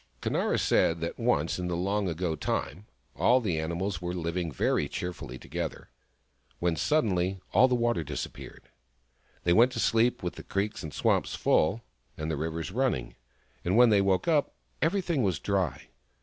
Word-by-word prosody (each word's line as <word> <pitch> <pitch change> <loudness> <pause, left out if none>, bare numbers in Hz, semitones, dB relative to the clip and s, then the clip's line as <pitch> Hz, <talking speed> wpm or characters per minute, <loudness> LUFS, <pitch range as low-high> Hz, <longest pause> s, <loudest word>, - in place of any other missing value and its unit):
Conara - - 0
said 85 0 +2
that 85 - -4
once 90 -10 +1
in 90 - -2
the 85 -1 -1
long 100 +2 0
ago 85 0 -2
time, 95 +6 -3 0.3
all 125 +2 +4
the 90 -10 -1
animals 85 +3 -2
were 90 0 -3
living 85 0 -2
very - - 0
cheerfully 70 -8 -5
together, - - -6 0.7
when 85 -1 0
suddenly 95 - +1
all 130 - +6
the 125 - +1
water 120 -8 +1
disappeared. 75 -1 -7 0.7
They 85 - +3
went 120 +6 +5
to 115 - -3
sleep 115 0 +2
with 90 - -4
the - - -8
creeks 100 +2 -2
and 80 - -6
swamps - - +1
full, 80 +9 +2 0.4
and 80 +1 -3
the - - 0
rivers 80 +3 -3
running; 110 - -1 0.5
and 90 +5 +1
when 120 -2 +7
they 100 -2 +5
woke 95 -2 +1
up, 155 -4 +2 0.3
every 185 +5 +2
thing 170 -6 0
was 95 -7 +1
dry. 95 -9 -2
90 Hz, 170 wpm, -28 LUFS, 80-115 Hz, 0.7 s, when